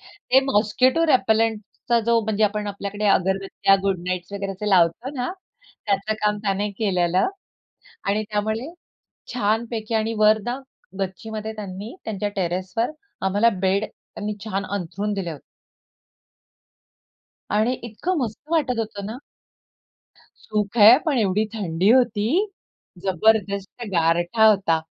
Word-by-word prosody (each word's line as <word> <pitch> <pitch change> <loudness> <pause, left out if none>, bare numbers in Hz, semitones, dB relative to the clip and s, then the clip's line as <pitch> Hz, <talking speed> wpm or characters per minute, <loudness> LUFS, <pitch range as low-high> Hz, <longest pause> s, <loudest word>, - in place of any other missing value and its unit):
ते 265 -10 +1
मॉस्किटो 255 +8 +3
रेपेलेंटचा 225 -2 +1
जो, 235 -1 +4
म्हणजे 215 0 +1
आपण 210 0 -1
आपल्याकडे 205 +1 -4
अगरबत्त्या, 195 0 +2
गुड 195 -2 0
नाईट्स 180 +1 -3
वगैरे 200 0 -4
लावतो 185 +7 +3
ना, 250 -1 -2 0.6
त्याचं 205 +1 0
काम 210 0 +2
त्याने 200 +1 0
केलेलं 185 - +2 0.8
आणि 205 +2 +1
त्यामुळे 220 +7 -2 0.6
छानपैकी 225 0 -1
आणि 220 +1 0
वर 215 0 +5
ना, 245 +2 -2 0.4
गच्चीमध्ये 215 +3 -4
त्यांनी 205 - -7
त्यांच्या 210 -2 -2
टेरेसवर 185 - -1 0.4
आम्हाला 205 +4 +3 0.2
बेड, 195 +3 +2
त्यांनी 210 0 -7
छान 200 -2 -2
अंथरून 200 +2 -3
दिले 190 -4 -3
होते. 150 -4 -9 2.1
आणि 215 +4 +2 0.2
इतकं 355 - -2
मस्त 230 -6 -3
वाटत 265 -7 +1
होतं 210 -3 -4
ना. 220 - -5 1.3
सुख 210 +1 -2
आहे, 220 +3 +10
पण 285 -5 +2
एवढी 210 -1 +2
थंडी 185 -3 0
होती, 240 -5 +3 0.8
जबरदस्त 200 +3 +1
गारठा 175 +5 +2
होता. 190 -6 +3
210 Hz, 120 wpm, -23 LUFS, 195-225 Hz, 2.1 s, आहे